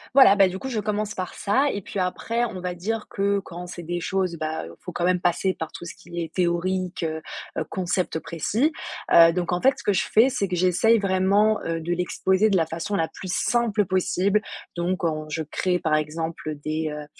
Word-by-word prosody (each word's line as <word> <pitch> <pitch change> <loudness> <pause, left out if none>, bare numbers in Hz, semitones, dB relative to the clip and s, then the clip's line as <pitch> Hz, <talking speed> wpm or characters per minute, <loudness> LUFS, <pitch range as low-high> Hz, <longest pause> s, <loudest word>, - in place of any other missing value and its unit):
Voilà, 260 -8 +8
ben 195 -2 +5
du 185 - -5
coup, 265 - -5
je 230 -4 -1
commence 210 +1 -2
par 185 -1 -4
ça 265 +8 +2
et 200 - -4
puis 195 - -5
après, 225 +6 -1
on 195 -6 -6
va 180 0 -3
dire 215 +5 -3
que 200 0 +1
quand 180 -2 -8
c'est 175 0 -8
des 175 +1 -3
choses, 185 -1 -1
ben, 155 0 -3
heu, 85 - -10
il - - -33
faut 180 - -6
quand 175 +1 -1
même 180 -1 +2
passer 185 +2 +1
par 160 -1 -6
tout 175 - -9
ce - - -7
qui 175 -1 -8
est 165 -1 -6
théorique, 180 0 0
heu, 160 0 -2 0.4
heu, - - 0
concept 180 -2 -1
précis. 205 - 0 0.4
Heu, 165 0 +9
donc 175 0 -1
en 175 - 0
fait, 270 +1 +5
ce - - -10
que 205 - +2
je 195 - +1
fais, 230 +5 +6
c'est 250 -7 -1
que 180 - -2
j'essaye 185 +6 +4
vraiment, 200 +2 +3
heu, 165 0 -2
de 170 +2 -2
l'exposer 190 +3 +1
de 195 - +3
la 165 - +2
façon 165 +5 -4
la 165 -2 +1
plus 185 +2 -7
simple 225 -3 +1
possible. 190 +3 +1 0.3
Donc 175 +2 -1
en 155 -2 -1
je 160 +1 -2
crée 180 +4 0
par 155 - 0
exemple, 160 +1 -3
heu, 155 - -3
des, 155 +2 -3
heu, 150 0 -6
180 Hz, 235 wpm, -24 LUFS, 170-200 Hz, 0.4 s, Heu